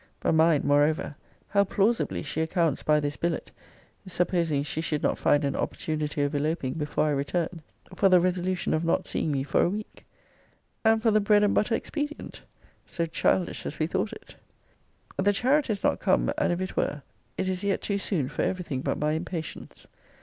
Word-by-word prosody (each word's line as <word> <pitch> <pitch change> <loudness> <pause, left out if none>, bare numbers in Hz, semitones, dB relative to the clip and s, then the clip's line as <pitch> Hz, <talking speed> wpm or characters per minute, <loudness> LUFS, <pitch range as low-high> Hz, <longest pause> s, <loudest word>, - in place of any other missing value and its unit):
But - - +1
mind, 160 -2 +4
moreover, 145 +1 +2 0.3
how 200 0 +4
plausibly 205 +2 0
she 155 +1 -2
accounts 160 -3 0
by 150 0 +3
this 145 0 -3
billet, 170 -1 -2 0.6
(supposing 170 -5 0
she 150 +2 -3
should 150 -2 -2
not - - +1
find 145 0 +3
an 140 - -1
opportunity 150 -2 -2
of 145 +1 -1
eloping 145 -2 -1
before 150 -1 -1
I 150 - +1
returned,) 160 +4 -2 0.3
for 195 +1 +4
the 180 -1 +6
resolution 180 +1 0
of 155 - 0
not 165 - +1
seeing 155 - -1
me 135 -2 0
for 145 - +1
a - - +3
week; 210 +3 -7 0.8
and 220 0 +3
for 225 - +4
the 215 0 +3
bread 205 0 +4
and 205 - +3
butter 225 +2 +2
expedient! 295 +3 -5 0.5
So 170 -2 -2
childish 170 +2 0
as 155 - -5
we 155 - +1
thought 190 +5 -1
it! - - -12 0.8
The 200 +2 +3
chariot 265 +6 +2
is 205 -2 -2
not - - +2
come; - - +2
and - - +1
if 175 +1 -1
it 185 - -4
were, 145 - -1 0.3
it 185 - -1
is 185 +1 -2
yet 200 -1 0
too 200 -1 -1
soon 170 -9 -1
for - - -3
every 185 -1 -1
thing 135 -5 -3
but - - -1
my 150 0 0
impatience. 160 0 -5
170 Hz, 195 wpm, -27 LUFS, 150-195 Hz, 0.8 s, the